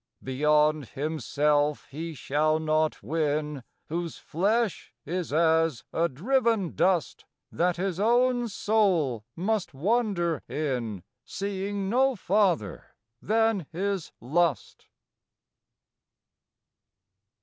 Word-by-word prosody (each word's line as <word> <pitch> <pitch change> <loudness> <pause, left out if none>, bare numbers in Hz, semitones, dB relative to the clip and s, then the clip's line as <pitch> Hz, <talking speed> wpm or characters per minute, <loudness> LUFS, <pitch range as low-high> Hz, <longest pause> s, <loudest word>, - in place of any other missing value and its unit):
Beyond 150 +1 +2
himself 150 +1 0
he 160 +3 -5
shall 155 +3 +1
not 155 0 0
win 150 -3 -1 0.2
Whose 170 0 -4
flesh 210 +5 -1
is 175 0 -3
as 160 -4 +2
a 170 +1 +1
driven 225 - +1
dust, 180 -4 +1 0.3
That 175 0 +1
his 185 -1 -2
own 245 +2 +3
soul 185 - +1
must 195 -3 -1
wander 180 - 0
in, 120 - -3 0.2
Seeing 200 +3 -3
no 260 +5 +3
farther 185 - 0 0.3
than 220 -5 +1
his 190 +1 -2
lust. 160 +5 -1
165 Hz, 90 wpm, -27 LUFS, 150-200 Hz, 0.3 s, own